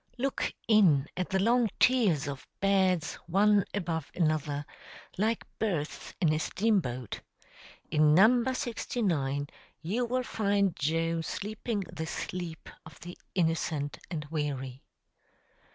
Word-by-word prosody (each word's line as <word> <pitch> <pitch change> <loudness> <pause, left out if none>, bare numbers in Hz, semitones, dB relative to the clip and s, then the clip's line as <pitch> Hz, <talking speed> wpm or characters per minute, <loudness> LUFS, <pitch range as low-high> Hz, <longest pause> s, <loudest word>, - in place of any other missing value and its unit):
] - - -32
Look 270 +2 -1 0.2
in 175 -11 +5
at 185 0 -2
the 190 - +1
long 230 +3 +3
tiers 210 - +3
of 140 -2 -6
beds 190 -4 +2
one 200 +3 +4
above 165 -6 -3
another, 155 -3 0 0.5
like 220 +4 0
berths 170 -9 -2
in 160 -4 +3
a 155 - 0
steam 210 +6 +2
boat. 125 - -5 0.7
In 150 0 +5
number 240 +7 +5
69 170 - -1 0.4
you 220 +9 0
will 255 +1 0
find 200 -5 +1
Joe 165 +2 0
sleeping 210 +5 -3
the 160 -3 -6
sleep 170 -1 -5 0.2
of 160 -3 -14
the 175 +1 -8 0.2
innocent 160 -4 0
and 155 -4 -4
weary. 135 -4 -3
175 Hz, 125 wpm, -30 LUFS, 155-210 Hz, 0.7 s, in